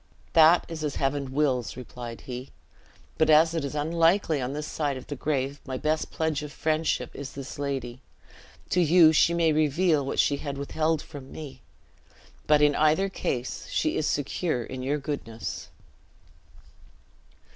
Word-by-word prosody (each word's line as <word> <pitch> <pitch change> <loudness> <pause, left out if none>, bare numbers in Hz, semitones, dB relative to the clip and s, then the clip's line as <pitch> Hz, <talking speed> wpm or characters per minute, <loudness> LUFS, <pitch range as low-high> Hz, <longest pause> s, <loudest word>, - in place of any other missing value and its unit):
"That 165 +2 +6
is 160 -2 -6
as 150 -2 -2
Heaven 135 -1 -1
wills," 130 -5 0
replied 120 -2 -8
he; 125 +1 -7 0.7
"but 160 - +3
as 160 +2 +6
it 165 -3 -1
is 140 +1 -4
unlikely 165 +1 +2
on 125 +2 -3
this 150 +1 -4
side 145 -4 -2
the 145 - -4
grave, 140 0 -2
my 130 -1 -4
best 155 +3 -1
pledge 160 -3 -1
of 150 -1 -7
friendship 155 +2 -1
is 140 -1 -7
this 140 0 -8
lady. 130 -3 -4 0.7
To 180 - +3
you 165 -1 +6
she 170 +2 +4
may 165 -2 +3
reveal 155 +1 +2
what 135 - -4
she 145 - +3
had 140 -1 -5
withheld 155 +2 -1
from 140 -4 -11
me; 135 -4 -9 0.9
but 150 -1 +5
in 145 0 +5
either 155 +7 +3
case, 125 -9 -3
she 155 - 0
is 155 - 0
secure 145 -2 -1
in 130 +2 -7
your 140 +3 0
goodness." 140 -6 -5
145 Hz, 155 wpm, -27 LUFS, 135-160 Hz, 0.9 s, That